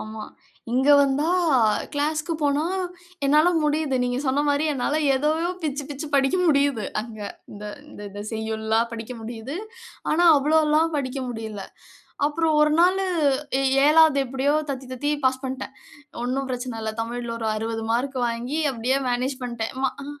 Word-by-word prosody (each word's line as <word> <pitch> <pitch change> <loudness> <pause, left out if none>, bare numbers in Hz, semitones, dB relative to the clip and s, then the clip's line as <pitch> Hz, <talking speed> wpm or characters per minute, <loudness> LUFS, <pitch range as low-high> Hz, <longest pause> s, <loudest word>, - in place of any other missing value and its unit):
ஆமா. 215 0 -7 0.5
இங்க 265 +3 +2
வந்தா 280 +3 +2 0.6
கிளாஸ்க்கு 310 +3 -1
போனா 290 +2 +2 0.6
என்னால 300 +5 +5
முடியுது. 300 -2 +1
நீங்க 245 0 -1
சொன்ன 275 +2 +1
மாரி 285 +2 +2
என்னால 280 +2 -1 0.2
எதயோ 310 +5 +1
பிச்சு 285 -2 -2
பிச்சு 290 +2 -5
படிக்க 270 +5 +3
முடியுது. 280 -7 +2 0.2
அங்க 220 -1 -9 0.3
இந்த 205 0 -9 0.5
இத 205 +1 -7
செய்யுள்லாம் 220 +1 -1
படிக்க 230 +2 -6
முடியுது. 235 +6 -6 0.5
ஆனா 345 +3 +4
அவ்ளோல்லாம் 310 +2 +3
படிக்க 270 -1 -3
முடியல. 220 -4 -6 0.6
அப்புறம் 315 0 +1
ஒரு 300 0 +4
நாளு 380 +2 +3 0.6
எ - - 0 0.2
7வது 310 -1 +6
எப்டியோ 270 +3 0 0.2
தத்தி 260 -1 -6
தத்தி 290 +4 -1
பாஸ் 260 +1 +1
பண்ட்டேன். 260 0 -5 0.5
ஒண்ணும் 265 +2 -2
பிரச்சன 245 -2 -4
இல்ல. 220 0 -2
தமிழ்ல 235 0 -5
ஒரு 225 - -2
60 225 +1 -3
மார்க் 260 +2 -1
வாங்கி 240 +6 -3
அப்டியே 250 +4 0
மேனேஜ் 255 +2 -1
பண்ட்டேன். 235 -1 -4
ம்மா. 265 -1 +1
அ - - -7
265 Hz, 145 wpm, -24 LUFS, 235-300 Hz, 0.6 s, 7வது